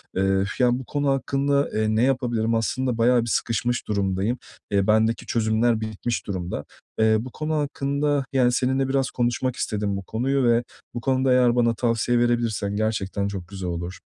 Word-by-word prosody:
Eee, 95 0 +2 0.2
yani, 125 0 +3
bu 130 - -8
konu 145 +1 -1
hakkında, 140 +1 +1
eee, 110 0 +1
ne 110 - +3
yapabilirim? 120 -4 +1
Aslında 125 +2 -1
bayağı 120 +1 +4
bir 115 - -4
sıkışmış 120 +2 -1
durumdayım. 100 +3 0 0.3
Eee, 100 -1 +2
bendeki 110 +1 +2
çözümler 110 0 +1
bitmiş 110 +2 -3
durumda. 90 -3 -4 0.3
Eee, 110 0 +4
bu 125 +3 -7
konu 155 +3 -3
hakkında, 145 -1 0
yani, 125 -2 +4
seninle 130 +2 +1
biraz 135 -1 0
konuşmak 120 +1 -1
istedim 105 -4 -2
bu 100 - -6
konuyu 130 +7 0
ve 120 0 +3 0.3
bu 120 - -4
konuda 130 0 +1
eğer 125 -1 +4
bana 115 -1 +2
tavsiye 120 +1 +1
verebilirsen 115 -4 0
gerçekten 100 -2 -1
çok 95 -4 -6
güzel 95 -2 -5
olur. 85 +1 -5
120 Hz, 170 wpm, -24 LUFS, 110-130 Hz, 0.3 s, bayağı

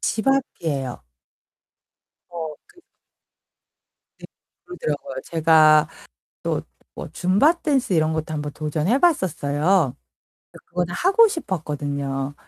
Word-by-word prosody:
집 220 - -2
앞이에요. 150 - -1 1.2
어, 165 -3 -5
그. 355 - -22 1.4
네, - - -11 0.4
그러더라고요. 150 - -5
제가 155 -1 +5 0.6
또 - - -1 0.3
뭐 - - -6
줌바 200 - +3
댄스 270 - +1
이런 160 -1 +2
것도 160 0 -3
1 150 - -3
번 145 - -5
도전해 155 - 0
봤었어요. 170 - +1 0.6
근데 - - -16
그거는 175 0 -3
하고 395 - +5
싶었거든요. 145 - -3
160 Hz, 220 characters per minute, -22 LUFS, 150-210 Hz, 1.4 s, 제가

